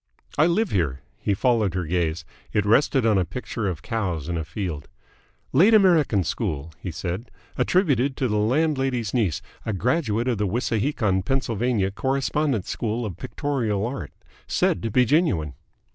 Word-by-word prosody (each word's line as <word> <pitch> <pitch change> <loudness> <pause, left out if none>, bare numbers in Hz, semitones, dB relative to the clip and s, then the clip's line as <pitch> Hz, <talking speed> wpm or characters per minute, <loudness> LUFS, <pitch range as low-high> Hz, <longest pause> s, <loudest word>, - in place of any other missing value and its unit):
"I 155 +2 +4
live 190 +5 +1
here." 70 -8 0 0.2
He 100 - 0
followed 110 -5 +2
her 90 -2 -1
gaze. 85 -1 -1 0.3
It 105 -1 +2
rested 130 +3 +3
on 105 -4 +4
a - - +2
picture 105 +4 -4
of 85 -4 -4
cows 90 -10 -2
in 85 - -2
a 80 - -2
field. 80 -2 -5 0.7
"Late 195 - +6
American 165 - +4
school," 85 -4 -3
he 95 - -5
said. 90 +7 -4 0.3
"Attributed 140 - +2
to 130 - +1
the 105 -2 0
landlady's 130 -1 +1
niece, 100 -7 0 0.2
a 110 - -2
graduate 120 - 0
of 120 -5 0
the 105 - +1
Wissahickon, 110 -2 0
Pa. 120 -3 0
Correspondence 135 -1 0
School 115 +1 -2
of 100 -6 -5
Pictorial 115 - -2
Art. 130 +3 -5 0.4
Said - - +1
to 115 - -2
be 125 +4 +4
genuine." 115 - +1
110 Hz, 160 wpm, -24 LUFS, 90-135 Hz, 0.7 s, Late